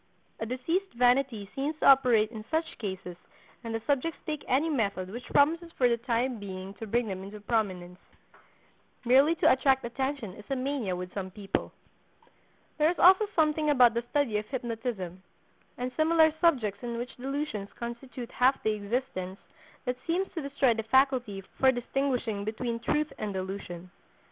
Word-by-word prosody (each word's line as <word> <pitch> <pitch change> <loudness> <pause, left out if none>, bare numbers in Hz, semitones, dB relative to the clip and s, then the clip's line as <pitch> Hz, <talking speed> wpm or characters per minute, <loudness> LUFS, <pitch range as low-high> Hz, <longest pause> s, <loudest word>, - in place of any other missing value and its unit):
A 220 - -3
diseased 325 - -1
vanity 245 -3 +2
seems 290 +3 -2
to - - -2
operate 245 -5 +6
in 220 -2 -7
such 320 +1 -2
cases 190 -4 -5 0.5
and 230 - -5
the 225 - -3
subjects 290 +3 0
take 305 -2 -3
any 275 +5 +2
method 200 - -1
which 240 +3 -7
promises 330 +4 +3
for 250 - +3
the 235 -1 +2
time 240 0 -1
being 190 -1 -7
to 225 - -6
bring 235 +2 +1
them 190 -2 -4
into 205 +2 -9
prominence. 190 -5 -2 1.1
Merely 270 +7 +5
to - - +4
attract 265 -1 +3
attention 265 -3 -3
is 210 +1 -13
a 275 - 0
mania 255 -7 -2
with 180 0 -6
some 190 -2 -4
people. 195 +1 -3 1.1
There 305 +1 +5
is 350 - -2
also 380 +4 +6
something 305 -1 +2
about 250 -5 +6
the 235 - 0
study 265 -8 +1
of 210 - -8
hypnotism, 225 -8 -4 0.6
and 250 +1 -3
similar 320 0 +4
subjects 235 - +2
in 235 -1 -4
which 240 +1 -5
delusions 270 -6 -3
constitute 235 +1 -7
half 260 +2 +2
the 220 - +2
existence, 205 -3 -3 0.5
that 250 -1 -1
seems 370 +4 0
to 330 - -3
destroy 280 -3 +2
the 225 - -2
faculty 245 -3 +2 0.2
for 265 0 +6
distinguishing 245 -4 -1
between 230 +2 -3
truth 300 +5 0
and 210 -2 -3
delusion. 185 -2 -6
245 Hz, 165 wpm, -29 LUFS, 210-275 Hz, 1.1 s, operate